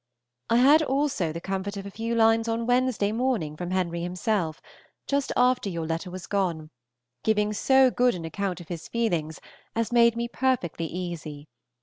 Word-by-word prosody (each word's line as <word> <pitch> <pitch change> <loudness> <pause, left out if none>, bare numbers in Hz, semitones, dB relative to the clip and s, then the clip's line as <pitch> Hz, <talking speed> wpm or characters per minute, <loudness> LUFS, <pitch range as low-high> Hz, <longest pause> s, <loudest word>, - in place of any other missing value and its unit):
I 230 - +3
had 280 +6 +6
also 270 - 0
the 165 - -5
comfort 195 +2 -4
of 195 - -6
a 200 - -7
few 230 +3 -3
lines 225 0 +4
on 230 0 -1
Wednesday 245 -4 +1
morning 225 - -1
from 175 +2 -5
Henry 175 -2 -1
himself, 180 -1 -1 0.5
just 280 -1 0
after 250 -4 +3
your 170 -3 -3
letter 165 +3 -3
was 185 0 -7
gone, 170 -6 -2 0.5
giving 210 -1 +1
so 265 +4 +4
good 245 -2 +2
an 170 -2 -6
account 185 +2 -3
of 175 - -11
his 170 -2 -6
feelings 170 -10 -1 0.4
as 230 +1 -1
made 235 -1 +5
me 235 0 -2
perfectly 235 -11 -1
easy. 160 -4 -6
200 Hz, 175 wpm, -26 LUFS, 170-235 Hz, 0.5 s, had